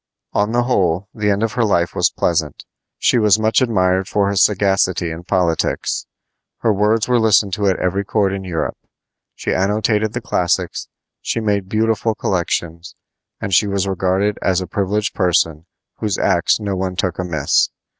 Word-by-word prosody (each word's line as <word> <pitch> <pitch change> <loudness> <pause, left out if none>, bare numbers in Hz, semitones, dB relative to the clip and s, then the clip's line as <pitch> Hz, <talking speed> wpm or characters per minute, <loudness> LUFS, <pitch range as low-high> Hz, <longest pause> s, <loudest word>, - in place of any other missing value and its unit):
On 105 +2 +1
the 120 +1 +2
whole, 95 -6 0
the 105 -1 -1
end 100 +2 +1
of 115 - -1
her 120 - +1
life 85 -6 +1
was - - +2
pleasant. 80 -4 -2 0.3
She 125 - +2
was 105 -1 +4
much 110 +4 +2
admired 95 -6 +1
for 100 -1 +1
her 100 - -2
sagacity 95 -3 +2
in 85 +2 -8
politics. 85 -3 -1 0.5
Her 110 - +2
words 105 +2 +1
were 125 -1 +3
listened 105 -3 +3
to 100 +1 0
at 95 - +2
every 95 +2 -1
court 100 -1 0
in 95 -1 -4
Europe. 85 -4 -3 0.6
She - - -2
annotated 105 +2 0
the 120 - -2
classics, 90 -6 -1 0.3
she - - -2
made 100 -3 -1
beautiful 110 +1 0
collections, 85 -3 -2 0.4
and 100 - -4
she 105 - +4
was 100 -1 -1
regarded 95 +2 0
as 95 -1 +1
a 95 - -4
privileged 105 +3 -1
person 80 -3 0 0.3
whose 105 -4 -2
acts - - +2
no 100 -2 -3
one 95 0 -3
took 90 -1 -2
amiss. 80 -6 +1
100 Hz, 170 wpm, -19 LUFS, 90-105 Hz, 0.6 s, was